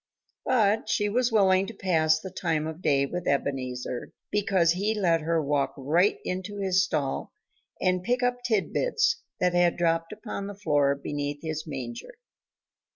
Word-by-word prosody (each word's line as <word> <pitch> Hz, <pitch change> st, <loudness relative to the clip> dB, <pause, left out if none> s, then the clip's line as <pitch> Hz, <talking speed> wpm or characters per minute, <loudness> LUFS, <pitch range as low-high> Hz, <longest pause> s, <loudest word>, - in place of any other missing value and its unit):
But 220 Hz, -3 st, +2 dB
she 210 Hz, -1 st, +1 dB
was 245 Hz, +3 st, +1 dB
willing 195 Hz, -3 st, +4 dB
to 225 Hz, -, -8 dB
pass 160 Hz, -5 st, +2 dB
the 190 Hz, +3 st, -8 dB
time 165 Hz, -4 st, -1 dB
of 160 Hz, +2 st, -6 dB
day 140 Hz, -4 st, +3 dB
with 175 Hz, +5 st, -5 dB
Ebenezer, 130 Hz, -3 st, -2 dB, 0.2 s
because 195 Hz, -5 st, +2 dB
he 200 Hz, +5 st, 0 dB
let 170 Hz, -4 st, +2 dB
her 165 Hz, +1 st, +1 dB
walk 145 Hz, -2 st, 0 dB
right 165 Hz, +9 st, +2 dB
into 190 Hz, +3 st, -4 dB
his 190 Hz, -1 st, +2 dB
stall 150 Hz, -8 st, -2 dB, 0.5 s
and 185 Hz, 0 st, +1 dB
pick 245 Hz, +6 st, 0 dB
up 245 Hz, 0 st, +2 dB
tidbits 465 Hz, -, +1 dB, 0.2 s
that 180 Hz, -1 st, +2 dB
had 175 Hz, -1 st, +3 dB
dropped 165 Hz, -1 st, +1 dB
upon 210 Hz, -2 st, -6 dB
the 205 Hz, -, -7 dB
floor 145 Hz, -7 st, +2 dB
beneath 145 Hz, +1 st, -4 dB
his 155 Hz, 0 st, -4 dB
manger. 135 Hz, -, -6 dB
175 Hz, 155 wpm, -27 LUFS, 150-205 Hz, 0.5 s, willing